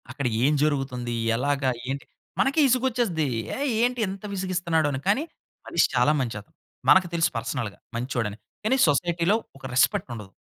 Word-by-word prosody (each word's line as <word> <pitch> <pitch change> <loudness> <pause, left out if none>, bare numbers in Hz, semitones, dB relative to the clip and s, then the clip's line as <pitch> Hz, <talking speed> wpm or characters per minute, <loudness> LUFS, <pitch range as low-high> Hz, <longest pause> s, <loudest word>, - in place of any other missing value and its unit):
అక్కడ 140 +1 -4 0.2
ఏం 150 - +4
జరుగుతుంది? 135 -5 -1 0.2
ఎలాగా? 135 +2 +1 0.2
ఏంటి? 140 +1 -3 0.3
మనకిసుగొచ్చేస్తది. 250 - +2 0.3
ఏహ్! 285 +2 -1
ఏంటి 245 +1 +1
ఎంత 195 +1 -7
విసిగిస్తున్నాడు 180 -4 0
అని, 130 - -2
కానీ 210 +9 +3 0.4
మనిషి - - +3
చాలా - - +4
మంచి 120 -4 -3
అతను. 100 - -26 0.3
మనకు 190 -1 +6
తెలుసు 170 -1 +2
పర్సనల్‌గా 115 -7 -4 0.2
మంచోడని. 115 -4 -2 0.3
కానీ 220 +5 +2
సొసైటీలో 170 +5 +2 0.2
ఒక 135 - -12
రెస్పెక్ట్ 180 +7 +2
ఉండదు. 105 -4 -9
155 Hz, 145 wpm, -25 LUFS, 130-195 Hz, 0.4 s, మనకు